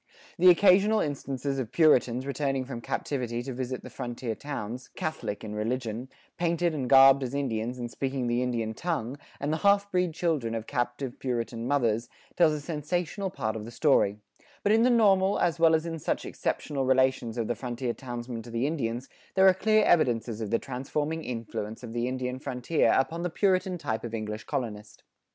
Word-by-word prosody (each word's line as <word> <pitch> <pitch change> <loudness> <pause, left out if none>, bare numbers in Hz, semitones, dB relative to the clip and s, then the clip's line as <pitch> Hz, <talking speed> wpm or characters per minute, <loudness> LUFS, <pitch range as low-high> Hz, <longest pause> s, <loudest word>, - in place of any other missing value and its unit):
The 180 +1 +8
occasional 200 +4 +5
instances 140 -2 -2
of 120 -3 -4
Puritans 130 -6 +3
returning 135 -2 -1
from 125 -3 -6
captivity 120 -2 -3
to 130 - -5
visit 130 0 -4
the - - -8
frontier 120 -1 -4
towns, 125 -2 -6
Catholic 155 -9 -4
in 105 -1 -6
religion, 115 +2 -3 0.3
painted 170 0 +1
and 135 -5 -3
garbed 135 0 +8
as 130 +1 -3
Indians 125 -3 -2
and 120 -1 -5
speaking 135 -2 -2
the 120 +1 +1
Indian 115 -3 -1
tongue,[44:3] 140 -3 -3 0.2
and 145 +2 0
the - - 0
half 200 +2 +3
breed 180 -3 0
children 155 -10 0
of 110 -1 -4
captive 120 +2 -3
Puritan 120 -2 -3
mothers, 120 -5 +1 0.3
tell 170 -3 +5
a 150 - -2
sensational 170 +5 -2
part 110 -10 -3
of 110 - -5
the 115 - -8
story; 120 -6 +2 0.5
but 205 - +3
in 220 +1 +5
the 245 - +5
normal, 200 -5 +4
as 170 -1 +1
well 165 -1 +6
as 160 +1 -1
in 165 -1 -4
such - - -2
exceptional 140 -2 -2
relations 130 -3 +2
of 115 -2 -1
the - - 0
frontier 120 0 -3
townsmen 120 -2 -6
to 120 - -11
the 115 +2 -1
Indians, 130 -4 -2 0.3
there 190 0 +6
are 190 - +7
clear 215 +3 +3
evidences 120 - +2
of 110 - -3
the 115 - +2
transforming 145 +6 -3
influence 115 -2 -5
of 115 -2 -7
the 120 +1 -1
Indian 130 0 -3
frontier 125 +5 +1
upon 165 +6 0
the 175 - -1
Puritan 185 0 +1
type 125 -9 -3
of 115 -1 -4
English 110 -1 -5
colonist. 105 -4 -5
130 Hz, 185 wpm, -28 LUFS, 120-160 Hz, 0.5 s, The